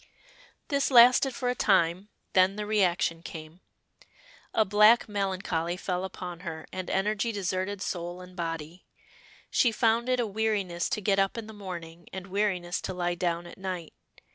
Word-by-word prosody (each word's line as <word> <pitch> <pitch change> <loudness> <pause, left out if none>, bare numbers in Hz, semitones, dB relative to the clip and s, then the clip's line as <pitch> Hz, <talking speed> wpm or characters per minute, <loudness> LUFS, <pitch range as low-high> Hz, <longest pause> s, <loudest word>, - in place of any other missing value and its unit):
This 280 -2 +1
lasted 250 +1 +6
for 250 - -2
a 245 - +2
time, 190 -3 +2 0.2
then 185 +1 +4
the 210 0 -4
reaction 180 -5 +1
came. 160 +1 -9 0.9
A 220 - +3
black 210 +4 +5
melancholy 185 -4 -2
fell 180 -1 -2
upon 180 -2 -6
her, 160 -3 -6
and 185 -1 -4
energy 210 +3 0
deserted 195 0 -2
soul 175 0 -4
and 180 0 -12
body. 165 0 -5 0.6
She 240 - +4
found 230 +2 +2
it 255 0 +2
a 240 - +1
weariness 205 -5 -1
to 215 - -2
get 195 0 +2
up 195 +3 +1
in 230 - -4
the 220 - -10
morning 175 -4 -8
and 190 -1 -6
weariness 190 -3 -1
to 185 - -4
lie 175 -1 0
down 175 -1 -1
at 175 - -12
night. 185 -4 -5
190 Hz, 165 wpm, -28 LUFS, 175-210 Hz, 0.9 s, lasted